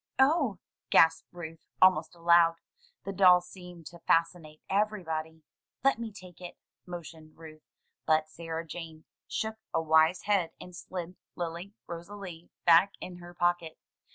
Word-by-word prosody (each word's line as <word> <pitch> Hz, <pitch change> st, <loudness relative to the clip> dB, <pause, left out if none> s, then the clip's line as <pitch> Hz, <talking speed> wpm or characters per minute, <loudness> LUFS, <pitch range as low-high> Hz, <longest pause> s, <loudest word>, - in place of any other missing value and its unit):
"Oh!" 265 Hz, -, +3 dB, 0.3 s
gasped 165 Hz, +2 st, +5 dB
Ruth, 165 Hz, -2 st, -9 dB
almost 180 Hz, -3 st, +4 dB
aloud. 170 Hz, 0 st, +5 dB, 0.5 s
The 195 Hz, -, -5 dB
doll 180 Hz, -2 st, +7 dB
seemed 180 Hz, -2 st, -12 dB
to 170 Hz, -, -13 dB
fascinate 165 Hz, -2 st, 0 dB
everybody. 160 Hz, -6 st, -2 dB, 0.4 s
"Let 275 Hz, -3 st, +3 dB
me 230 Hz, -2 st, -5 dB
take 185 Hz, -3 st, -14 dB
it," 175 Hz, -, -9 dB, 0.3 s
motioned 160 Hz, -3 st, -10 dB
Ruth; 155 Hz, -1 st, -13 dB, 0.4 s
but 155 Hz, 0 st, +3 dB
Sarah 165 Hz, 0 st, -6 dB
Jane 160 Hz, -1 st, -9 dB, 0.2 s
shook 220 Hz, 0 st, -3 dB, 0.2 s
a -, -, +3 dB
wise 160 Hz, +2 st, +3 dB
head, 190 Hz, -6 st, +1 dB
and 180 Hz, -1 st, -11 dB
slid 180 Hz, 0 st, -7 dB, 0.2 s
Lily 175 Hz, +3 st, -5 dB
Rosalie 175 Hz, 0 st, -9 dB, 0.2 s
back 175 Hz, +4 st, +6 dB
in 180 Hz, -1 st, -8 dB
her 175 Hz, 0 st, -12 dB
pocket. 175 Hz, -2 st, 0 dB
175 Hz, 135 wpm, -29 LUFS, 160-185 Hz, 0.5 s, doll